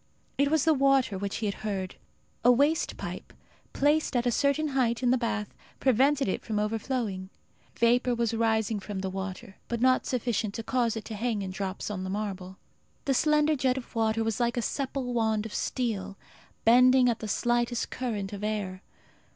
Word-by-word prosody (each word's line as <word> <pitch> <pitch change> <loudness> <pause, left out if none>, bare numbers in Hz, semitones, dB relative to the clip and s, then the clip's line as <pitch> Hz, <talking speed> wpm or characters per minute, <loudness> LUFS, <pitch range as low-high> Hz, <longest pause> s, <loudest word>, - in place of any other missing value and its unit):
It 280 0 +4
was 315 -2 +2
the 320 - +5
water 270 -6 +3
which 200 +1 -3
he 225 - -3
had 200 - -3
heard. 195 -3 -3 0.5
A 245 - +7
waste 290 +6 +2
pipe, - - -7 0.4
placed 295 0 +1
at 245 0 +1
a 245 - +2
certain 280 +4 +1
height 255 -3 0
in 245 - +4
the - - +5
bath, 225 -3 -2 0.3
prevented 270 +2 +3
it 190 - -2
from 215 -2 -3
overflowing. 210 -2 -2 0.5
Vapour 245 +1 +3
was 235 -1 0
rising 220 -1 +1
from 200 -1 -5
the 190 0 -3
water, 190 0 -6
but 235 - -2
not 255 +1 +3
sufficient 230 -4 -1
to 225 - -4
cause 235 -2 0
it 220 - -6
to 225 - -6
hang 215 -1 -1
in 190 - -4
drops 190 +2 -4
on 185 -2 -4
the 185 - -4
marble. 190 -2 -4 0.5
The 275 - +2
slender 300 +2 +3
jet 260 -2 +1
of 255 - -8
water 225 0 +1
was 225 0 -1
like 240 0 0
a - - +2
supple 265 0 -2
wand 220 -2 +1
of 220 - -7
steel, 200 -6 -2 0.5
bending 250 +2 +6
at 235 -2 +1
the 220 - -5
slightest 240 +2 0
current 210 -6 -3
of 205 0 -6
air. 205 -3 -3
230 Hz, 190 wpm, -28 LUFS, 210-255 Hz, 0.5 s, A